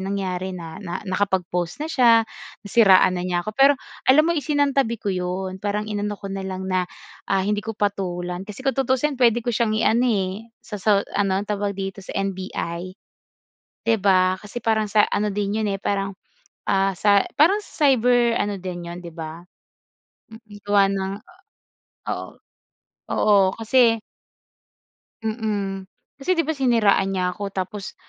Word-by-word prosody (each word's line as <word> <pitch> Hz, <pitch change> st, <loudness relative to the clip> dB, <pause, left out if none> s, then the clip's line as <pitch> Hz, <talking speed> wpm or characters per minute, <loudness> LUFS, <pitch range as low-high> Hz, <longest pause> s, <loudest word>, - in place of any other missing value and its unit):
nangyari 190 Hz, -1 st, -3 dB
na, 165 Hz, +1 st, -8 dB
na 175 Hz, -3 st, -4 dB
nakapag-post 185 Hz, -, -1 dB
na 305 Hz, -, -3 dB
siya, 230 Hz, -5 st, +5 dB, 0.4 s
nasiraan 190 Hz, -4 st, +5 dB
na 180 Hz, -, -3 dB
niya 180 Hz, -1 st, -1 dB
ako. 215 Hz, -, -4 dB
Pero 275 Hz, +1 st, +6 dB, 0.4 s
alam 305 Hz, +4 st, +6 dB
mo 340 Hz, -, +2 dB
isinantabi 285 Hz, -6 st, +1 dB
ko 200 Hz, -3 st, -3 dB
'yon, 185 Hz, +1 st, -3 dB
parang 210 Hz, +1 st, -1 dB
inano 205 Hz, 0 st, -2 dB
ko 195 Hz, -1 st, -7 dB
na 195 Hz, -, -4 dB
lang 190 Hz, 0 st, -5 dB
na, 185 Hz, -1 st, -1 dB, 0.4 s
ah, 190 Hz, -1 st, +1 dB
hindi 210 Hz, +1 st, 0 dB
ko 220 Hz, 0 st, -6 dB
patulan. 180 Hz, -3 st, -2 dB
Kasi 210 Hz, +6 st, -9 dB
kung 270 Hz, -, +2 dB
tutuusin 270 Hz, +2 st, +1 dB
puwede 235 Hz, -1 st, +4 dB
ko 240 Hz, -, 0 dB
siyang 215 Hz, -1 st, +1 dB
iano 235 Hz, +3 st, +3 dB
eh, 200 Hz, +1 st, -2 dB, 0.2 s
sa 210 Hz, -2 st, -7 dB
sa 200 Hz, -1 st, +3 dB
ano, 195 Hz, -2 st, +1 dB
tawag 205 Hz, -1 st, -2 dB
dito, 195 Hz, 0 st, -4 dB
sa -, -, -9 dB
NBI, 185 Hz, -2 st, -4 dB, 1.0 s
'di 225 Hz, -, +5 dB
ba? 185 Hz, -1 st, +4 dB
Kasi 210 Hz, +5 st, -8 dB
parang 220 Hz, -1 st, +1 dB
sa 210 Hz, 0 st, +4 dB
ano 205 Hz, 0 st, 0 dB
din 205 Hz, +2 st, -1 dB
yun 210 Hz, -, 0 dB
eh, 195 Hz, -, -4 dB
parang, 195 Hz, -1 st, -1 dB, 0.5 s
ah, 195 Hz, -1 st, +1 dB
sa 200 Hz, -1 st, +4 dB, 0.2 s
parang 380 Hz, +8 st, +5 dB
cyber 245 Hz, -, +3 dB
ano 205 Hz, -1 st, -2 dB
din 175 Hz, -2 st, -6 dB
yun, 175 Hz, -, -7 dB
'di 175 Hz, -2 st, -9 dB
ba? 160 Hz, +1 st, -8 dB, 0.9 s
Mm, 220 Hz, -2 st, -13 dB
gawa 205 Hz, -1 st, +4 dB
ng 195 Hz, 0 st, -2 dB, 1.0 s
oo. -, -, -4 dB, 0.8 s
Oo, 200 Hz, -3 st, +4 dB
kasi 230 Hz, 0 st, +4 dB, 1.3 s
Mm. 205 Hz, -4 st, -3 dB, 0.3 s
Kasi, 365 Hz, +7 st, +1 dB
'di 330 Hz, -, +3 dB
ba, -, -, -1 dB
siniraan 230 Hz, -7 st, +3 dB
niya 180 Hz, -1 st, 0 dB
ako. 200 Hz, -1 st, -5 dB
Tapos 190 Hz, +2 st, -5 dB
200 Hz, 160 wpm, -23 LUFS, 190-225 Hz, 1.3 s, Pero